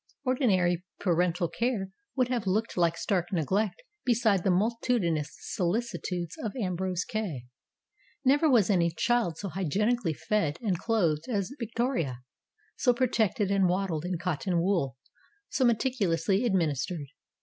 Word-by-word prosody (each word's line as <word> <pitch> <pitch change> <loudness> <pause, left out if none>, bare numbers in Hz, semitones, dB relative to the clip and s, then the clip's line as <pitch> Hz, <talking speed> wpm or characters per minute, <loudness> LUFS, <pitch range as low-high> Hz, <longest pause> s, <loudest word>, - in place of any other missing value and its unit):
Ordinary 190 - +2 0.2
parental 175 -1 +1
care 225 -2 -1 0.3
would 255 -2 +2
have 240 -6 -1
looked 215 +5 0
like 170 -1 +2
stark 180 -5 -1
neglect 200 - 0 0.2
beside 220 -6 +2
the - - +2
multitudinous 185 - +1
solicitudes 180 -3 -2
of 215 0 -4
Ambrose 185 -5 -1
Kay. 195 - -3 0.8
Never 290 +4 +4
was 225 -6 +4
any 170 -3 +3
child 175 +2 +1
so 200 - -4
hygienically 195 +3 0
fed 165 -7 0
and 195 -8 -1
clothed 170 -10 +1
as 200 -2 -1
Victoria, 230 - -2 0.5
so 245 -2 +3
protected 225 -4 +1
and 195 -2 +3
waddled 180 -4 -1
in 180 0 -2
cotton 175 +1 -1
wool, 170 -8 0 0.5
so 265 - 0
meticulously 215 -5 +1
administered. 165 - 0
190 Hz, 125 wpm, -29 LUFS, 170-230 Hz, 0.8 s, Never